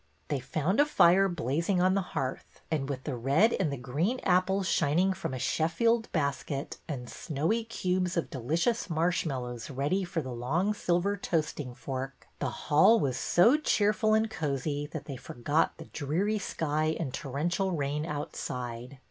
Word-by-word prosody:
They 145 - 0
found 155 - -1
a 290 - +7
fire 195 - +5
blazing 170 - 0
on 185 +1 +4
the 195 - +2
hearth, 135 -7 -5
and 145 -3 -1
with 130 -2 -4
the 145 - -3
red 140 - +3
and 160 -6 0
the 140 - -3
green 150 - -1
apples 190 +1 +2
shining 170 +5 +2
from 185 - -4
a 130 - -3
Sheffield 225 - +1
basket, 140 -2 -2
and 130 -6 -5
snowy 165 - -1
cubes 185 -5 -1
of 170 - -1
delicious 165 - 0
marshmallows 155 -8 -1
ready 145 +8 0
for 170 -3 -3
the 130 - -5
long 155 - 0
silver 185 0 +1
toasting 155 -8 -2
fork, 135 0 -5
the 140 - -1
hall 155 - +4
was 135 -8 0
so 230 +12 +4
cheerful 215 -6 +2
and 220 0 +1
cozy 145 -2 -2
that 155 -1 -7
they 140 -3 -6
forgot 145 +7 0
the 160 - -9
dreary 180 +11 -1
sky 155 -3 -1
and 140 -7 -3
torrential 165 +8 -1
rain 150 -2 -1
outside. 125 -4 -5
160 Hz, 160 wpm, -29 LUFS, 140-185 Hz, -, a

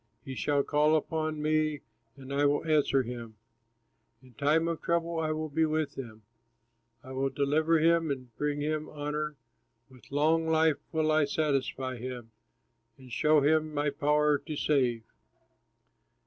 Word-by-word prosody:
He 135 - -6
shall 140 +2 +1
call 150 +2 +3
upon 155 0 -2
me 155 -2 +1 0.4
and 135 0 -8
I 140 +1 +1
will 145 +2 +1
answer 150 -4 +2
him, 120 -2 -7 0.9
In 130 -1 -18
time 150 +7 +2
of 165 -1 -3
trouble 170 -1 0
I 160 -1 -1
will 155 0 -2
be 160 +2 0
with 155 -2 0
him, 115 -6 -9 0.8
I 130 - -10
will 135 +1 -1
deliver 155 +4 +2
him 165 0 +3
and 130 -4 -5
bring 145 +2 -2
him 155 +1 -2
honor, 150 0 -4 0.6
With 130 0 -18
long 160 +3 +2
life 160 -1 +3
will 155 -1 +1
I 155 -1 +4
satisfy 135 -3 -1
him, 120 -1 -7 0.7
And 130 -2 -15
show 150 +3 +3
him 155 +1 +2
my 145 0 +1
power 150 0 +2
to 155 +1 -6
save." 125 -6 +1
150 Hz, 150 wpm, -29 LUFS, 135-155 Hz, 0.9 s, I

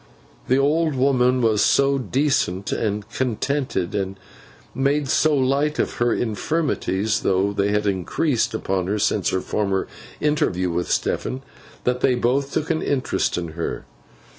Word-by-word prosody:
The 130 - +3
old 150 +2 +2
woman 130 -1 +2
was 110 -2 +3
so 140 0 +3
decent 130 -8 0
and 105 -2 -2
contented, 130 -5 -1
and 95 -1 -2 0.6
made 140 +2 +1
so 155 +3 +3
light 140 +3 +1
of - - -1
her 120 0 +3
infirmities, 110 - -1
though 95 +2 +1
they 100 0 +1
had 105 0 0
increased 110 - 0
upon 95 -4 -1
her 105 +2 0
since 105 -1 +1
her 95 - -1
former 100 -2 -1 0.3
interview 95 - +1
with 85 +1 -2
Stephen, 130 +1 -1 0.4
that 125 0 0
they 130 - +3
both 135 +3 0
took 155 - -1
an 160 - 0
interest 135 -2 0
in 85 -2 -3
her. 85 +1 -4
125 Hz, 145 wpm, -22 LUFS, 100-140 Hz, 0.6 s, The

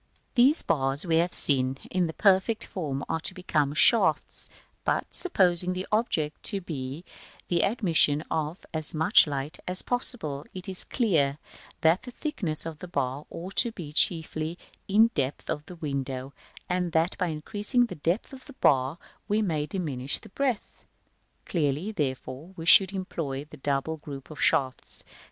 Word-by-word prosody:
] - - -43
These 265 +5 +4
bars 135 +1 0
we 165 -2 +2
have 170 +2 +2
seen, 130 -2 +3
in 180 -2 +1
the 160 - -5
perfect 195 +4 +3
form, 145 -7 -4
are 165 - -1
to 185 - -6
become 150 -6 0
shafts; 230 +9 +3 0.3
but, - - +1
supposing 180 - +3
the 185 +1 -4
object 165 -9 0
to 200 - -1
be 150 -2 -6 0.4
the 170 -1 +2
admission 165 -8 +3
of 160 +2 -2
as 155 0 +2
much 160 0 +6
light 145 +2 -4
as 180 +1 -1
possible, 225 - +1
it 185 +2 -7
is 185 -1 -5
clear 155 - +1 0.4
that 165 +3 +4
the 250 - -9
thickness 220 - -2
of 160 -2 -6
the 180 - -8
bar 140 -3 -2
ought 185 +3 -8
to 235 - +3
be 155 -7 -8
chiefly 160 +1 +1 0.3
in 210 +3 +5
the 230 - +4
depth 140 - -2
of 150 - -4
the 180 - -9
window, 135 -4 -4 0.3
and 180 -2 -1
that 165 +2 +2
by 180 - +1
increasing 205 - 0
the 235 - -7
depth 170 - -2
of 260 - -11
the 280 - -12
bar 135 - +2 0.3
we 210 +1 +2
may 155 -6 -1
diminish 145 -7 -2
its - - -15
breadth: 260 -6 -2 0.6
clearly, 155 +4 -1
therefore, 135 0 -4
we 165 - -6
should 190 +2 +8
employ 160 -8 -4
the 155 0 -13
double 140 +3 -1
group 140 -1 -9
of 155 - -8
shafts, 130 -2 +1
b, - - -34
of - - -21
Fig. - - -18
160 Hz, 175 wpm, -27 LUFS, 145-190 Hz, 0.6 s, should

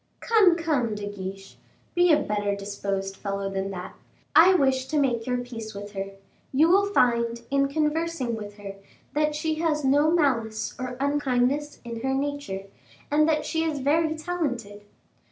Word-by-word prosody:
"Come, 420 -7 +5
come, 290 -10 0
De 205 0 -5
Guiche, 195 -1 -7 0.4
be 350 0 +4
a 305 - +6
better 205 -7 -1
disposed 195 -1 -3
fellow 195 0 -3
than 195 0 -2
that. 185 -1 -6 0.4
I 370 +3 +8
wish 265 -4 +2
to 310 - -1
make 245 -5 +1
your 250 0 +1
peace 230 -3 -7
with 205 +1 -7
her; 195 -1 -5 0.4
you 305 +5 +4
will 400 +3 +4
find, 235 -6 +2
in 275 0 +3
conversing 305 -3 -1
with 205 -1 -8
her, 200 -1 -8 0.4
that 300 0 +1
she 310 +1 -1
has 305 -3 0
no 290 +3 +4
malice 230 -10 +1
or 255 -1 -4
unkindness 280 0 0
in 235 -1 -6
her 265 +1 0
nature, 285 -8 -3 0.5
and 305 +2 +4
that 310 -1 +1
she 320 -1 0
is 315 -2 -1
very 310 +4 +1
talented." 270 - -3
260 Hz, 165 wpm, -26 LUFS, 210-305 Hz, 0.5 s, I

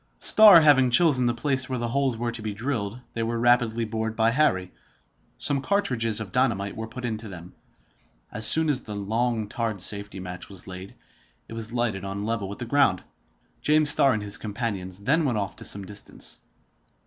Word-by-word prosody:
Starr 210 -6 +7
having 140 -4 +5
chosen 125 -2 +4
the 120 - +1
place 130 +1 -2
where 130 - -2
the 120 -1 -3
holes 135 -1 0
were 120 +1 -2
to 115 -1 -7
be 105 -1 -5
drilled, 115 -2 -3
they 115 - -4
were 115 +1 -2
rapidly 120 -1 +2
bored 110 0 -4
by 115 0 +2
Harry. 95 -10 +1 0.7
Some 140 -2 +2
cartridges 125 - +1
of 105 -4 -7
dynamite 100 -6 0
were 110 0 -6
put 125 +2 -8
into 110 -2 -5
them. 90 -1 -11 0.8
As 110 0 +3
soon 160 +8 +7
as 140 -4 0
the 105 -2 -8
long, 110 +2 -2
tarred 115 -2 -3
safety 100 +1 -1
match 90 0 -8
was 95 -3 -9
laid, 95 +1 -10 0.5
it - - -10
was 115 0 -5
lighted 120 -5 -2
on 95 0 -5
a - - -4
level 110 -3 -3
with 100 - -7
the 120 - -6
ground. 130 -8 +2 0.6
James 150 0 +3
Starr 135 -2 +4
and 105 - -4
his 100 0 -3
companions 100 -4 -5
then 150 +10 +1
went 125 -7 0
off 100 -2 -4
to - - -10
some 100 -1 -5
distance. 100 +1 -8
115 Hz, 195 wpm, -25 LUFS, 100-125 Hz, 0.8 s, Starr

